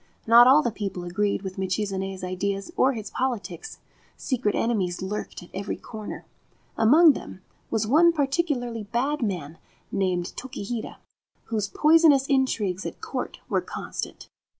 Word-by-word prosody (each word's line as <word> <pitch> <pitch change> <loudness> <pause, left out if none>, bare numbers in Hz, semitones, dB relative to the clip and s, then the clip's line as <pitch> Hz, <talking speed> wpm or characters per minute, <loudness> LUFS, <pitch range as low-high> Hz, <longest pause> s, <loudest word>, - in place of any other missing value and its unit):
Not 235 +2 +8
all 290 +4 +7
the 240 - 0
people 195 -4 -5
agreed 200 +3 -1
with 190 0 -6
Michizane's 190 0 -2
ideas 195 +2 -3
or 265 +1 +3
his 215 -3 -6
politics. 260 - -3 0.4
Secret 245 -6 -1
enemies 190 -6 0
lurked 200 -1 -5
at 175 - -16
every 195 +2 -3
corner. 215 -2 -8 0.5
Among 300 +8 +6
them 185 - -9 0.3
was 220 -1 0
one 320 +9 +5
particularly 275 -6 -1
bad 260 +8 -1
man 170 -8 -3 0.3
named 180 -2 -1
Tokihira, 240 -3 -5 0.5
whose 215 -3 -2
poisonous 305 +1 +5
intrigues 230 -9 0
at - - -6
Court - - -5
were - - +1
constant. - - -6
215 Hz, 135 wpm, -25 LUFS, 195-265 Hz, 0.5 s, Not